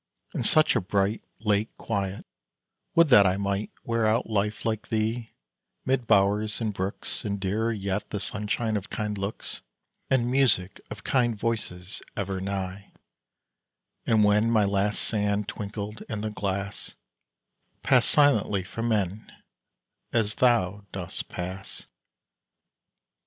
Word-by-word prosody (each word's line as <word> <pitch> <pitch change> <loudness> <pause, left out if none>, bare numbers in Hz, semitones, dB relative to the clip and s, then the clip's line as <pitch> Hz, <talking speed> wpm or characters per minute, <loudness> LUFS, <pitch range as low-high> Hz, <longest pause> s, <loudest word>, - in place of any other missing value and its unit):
In - - -2
such 155 0 +5
a - - +3
bright, 100 +3 0 0.2
late 105 0 +1
quiet, 100 -3 -3 0.7
would 170 -2 +6
that 105 -7 +8
I 95 +1 +1
Might 100 +1 -1
wear 115 -1 +1
out 110 +3 +2
life 105 -1 -1
like 110 -2 -1
thee, 110 +1 -1 0.5
'mid 130 -2 0
bowers 105 +2 +3
and 110 -3 -1
brooks, 95 +1 -4
And 100 -1 -2
dearer 105 +4 0
yet, 100 -1 -3
the 105 - -3
sunshine 105 +2 -1
of 100 +1 -6
kind 105 -1 -2
looks, 100 +2 -5 0.5
And 125 -2 +2
music 120 -9 +2
of 105 -2 -8
kind 120 -4 +2
voices 100 -4 -3 0.2
ever 95 -2 -2
nigh; 95 0 -4 1.1
And 110 -2 +4
when 105 +2 +4
my 110 -3 +4
last 100 +1 +1
sand 105 -1 0
twinkled 105 +1 -5
in 110 -1 -3
the 110 0 -2
glass, 100 -1 -4 0.9
Pass - - +4
silently 110 -9 +4
from 115 +5 -4
men, 105 -2 -1 0.8
as 110 -2 +1
thou 105 -6 +2
dost 90 -3 -5
pass. 95 +2 -6
105 Hz, 130 wpm, -27 LUFS, 100-115 Hz, 1.1 s, that